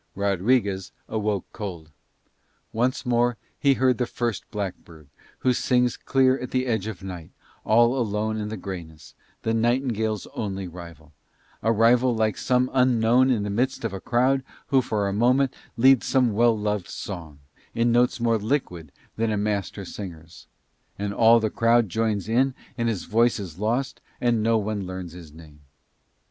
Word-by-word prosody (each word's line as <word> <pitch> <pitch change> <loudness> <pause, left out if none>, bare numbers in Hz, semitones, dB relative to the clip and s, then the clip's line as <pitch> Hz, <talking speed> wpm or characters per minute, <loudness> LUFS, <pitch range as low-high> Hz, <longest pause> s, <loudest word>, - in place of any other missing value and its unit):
Rodriguez 100 0 0 0.2
awoke 105 -3 -1
cold. 85 -7 -7 0.8
Once 125 +4 0
more 120 -1 +2 0.2
he 140 -2 +4
heard 130 -2 +2
the 125 - 0
first 120 -4 -3
blackbird 85 -7 -7 0.3
who 130 - +3
sings 125 0 +1
clear 130 0 +2
at 125 - -5
the 130 0 0
edge 110 -5 -1
of 95 -4 -7
night 90 -4 -7 0.3
all 120 +3 +4
alone 110 -3 -1
in 105 -1 -3
the 110 - -5
greyness, 85 -5 -8 0.3
the 115 - 0
nightingale's 115 -3 0
only 95 -3 -4
rival; 85 -3 -12 0.5
a 110 - +2
rival 120 +2 +4
like 110 -1 +1
some 125 0 +1
unknown 125 0 +4
in 115 -5 +1
the 100 - -3
midst 125 +3 -1
of 110 - -2
a 95 - -6
crowd 130 +3 +2 0.3
who 135 -1 +4
for 105 -4 -1
a 100 - -2
moment 125 +5 +2 0.2
leads 130 +1 +5
some 125 -5 +2
well 115 +1 +3
loved 105 -3 -2
song, 85 -7 -7 0.4
in 115 +1 +2
notes 120 +1 +2
more 115 -1 +2
liquid 100 - -2 0.3
than 115 0 0
a 105 - 0
master 100 -1 -2
singer's; 85 -4 -9 0.5
and 100 0 -3
all 115 +2 +6
the 110 -2 -1
crowd 115 -1 +3
joins 105 0 -1
in 130 +4 +2 0.2
and 115 -1 0
his 105 -5 -2
voice 115 +1 +2
is 90 -4 -8
lost, 120 +6 -1 0.2
and 120 -2 +1
no 115 +1 +3
one 105 -2 -3
learns 95 -2 -6
his 85 -3 -12
name. 75 -1 -15
110 Hz, 165 wpm, -24 LUFS, 100-120 Hz, 0.8 s, all